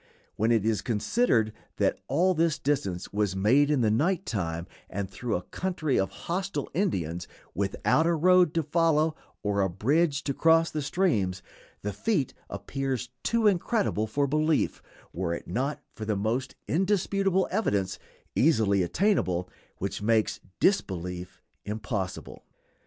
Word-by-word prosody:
When 110 +3 +1
it 110 -3 +2
is 110 -3 +1
considered 115 - +1 0.2
that - - +1
all 185 +2 +3
this 165 -2 +1
distance 100 -13 -2
was 105 -2 0
made 125 +10 +4
in 145 -4 +2
the 110 -2 +3
night 170 - +1
time, 85 -5 -2 0.2
and 100 0 -3
through 110 +4 -3
a 90 - -2
country 170 - -1
of 95 - +1 0.2
hostile 180 -4 -2
Indians, 90 - -1 0.3
without 100 - +1
a 170 - +3
road 180 0 +5
to 165 - +2
follow 160 0 +2 0.3
or 100 -1 +1
a 95 - +2
bridge 140 - +1
to 140 - -1
cross 165 +3 +4
the 155 - -2
streams, 110 - 0 0.4
the 105 0 -2
feat 145 - 0 0.2
appears 130 +5 -3
too 230 -1 +1
incredible 195 - +2
for 140 +6 +1
belief 155 +2 +1 0.3
were 85 0 -1
it - - -9
not 130 +11 -1
for 110 - -8
the 105 -1 -1
most 115 +6 -1
indisputable 190 +1 +1
evidence, 100 - 0 0.4
easily 110 -10 +3
attainable, 90 - +1 0.3
which 100 +1 -3
makes 110 0 +2 0.2
disbelief 90 - -1 0.2
impossible. 105 -2 -4
130 Hz, 140 wpm, -28 LUFS, 100-165 Hz, 0.4 s, road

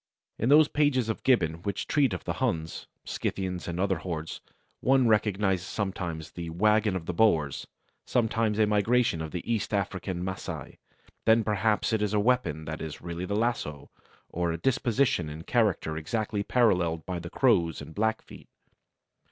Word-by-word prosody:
In 115 - +1
those 150 +1 +7
pages 145 -7 +1
of 110 - -2
Gibbon 85 -11 +2
which 100 +1 -3
treat 140 -5 +2
of 90 - -4
the - - -2
Huns, 80 0 -2 0.2
Scythians, 95 -2 -3
and 85 0 -3
other 95 0 +1
hordes, 80 -3 -5 0.4
one 130 -1 +3
recognizes 100 -4 +1
sometimes 90 -6 -4
the 85 -1 -6
wagon 105 +4 +2
of 85 -3 -4
the 90 - -3
Boers; 80 -8 +2 0.4
sometimes 110 -2 +1
a 110 - +4
migration 105 -3 +2
of 80 - -4
the 90 +2 -5
East 110 -2 -1
African 95 -2 -2
Masai; 90 -6 -6 0.5
then 110 0 +5
perhaps 105 +1 +1
it 110 - +1
is 105 0 0
a - - +3
weapon 105 -10 +1
that 80 0 -5
is 80 -2 -6
really 85 +1 -4
the 100 - -2
lasso, 105 - -2 0.4
or 85 -1 -1
a 85 - -2
disposition 120 - +1
and 80 +2 -8
character 105 -9 +1
exactly 105 +6 -2
paralleled 90 -9 +2
by 90 -1 -3
the 85 0 -7
Crows 90 - +2
and 80 - -9
Blackfeet. 110 +3 -3
100 Hz, 165 wpm, -28 LUFS, 85-110 Hz, 0.5 s, those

